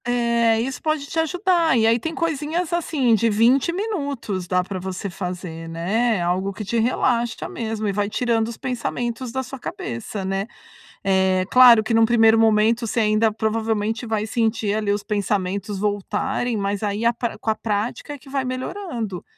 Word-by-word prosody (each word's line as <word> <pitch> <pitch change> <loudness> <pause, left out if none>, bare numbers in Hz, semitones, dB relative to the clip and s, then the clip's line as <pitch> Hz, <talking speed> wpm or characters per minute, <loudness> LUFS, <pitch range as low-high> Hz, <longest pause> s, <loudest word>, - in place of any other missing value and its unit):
Eh, 235 -2 +2
isso 260 +2 -4
pode 310 -2 -1
te 325 - -3
ajudar. 340 -2 +2
E 220 - +3
aí 230 +1 +4
tem 320 +6 -4
coisinhas 325 +2 -2
assim 300 -8 +1
de 225 +1 +3
20 235 +8 +3
minutos. 285 - -3
Dá 180 +1 +1
para 190 0 -5
você 190 +1 -5
fazer, 180 -3 -6
né. 205 +7 0
Algo 185 +3 0
que 210 +2 -7
te 230 +4 0
relaxa 235 0 0
mesmo 220 -2 -3
e - - +1
vai 205 +1 -1
tirando 225 0 0
os 230 - -7
pensamentos 245 -1 -3
da 260 +2 -2
sua 270 +1 -9
cabeça, 190 - -5
né. 195 +2 -2 0.6
Eh, 190 -1 +2
claro 245 -3 +8
que 230 - -2
num 225 0 +5
primeiro 225 -1 +5
momento, 225 +1 +3
você 230 +1 0
ainda 215 +1 +3
provavelmente 220 +1 -1
vai 220 -2 -1
sentir 220 -2 0
ali 210 -1 0
os 205 0 -3
pensamentos 200 -1 -2
voltarem, 210 +4 -1
mas 200 -1 -2
aí 210 +1 -2
a 235 - +4
pra 235 0 -4
com - - -4
a 220 - +2
prática 215 +6 -3
é - - -7
que 275 0 -17
vai 270 -1 -1
melhorando. 255 - -4
225 Hz, 180 wpm, -22 LUFS, 205-250 Hz, 0.6 s, claro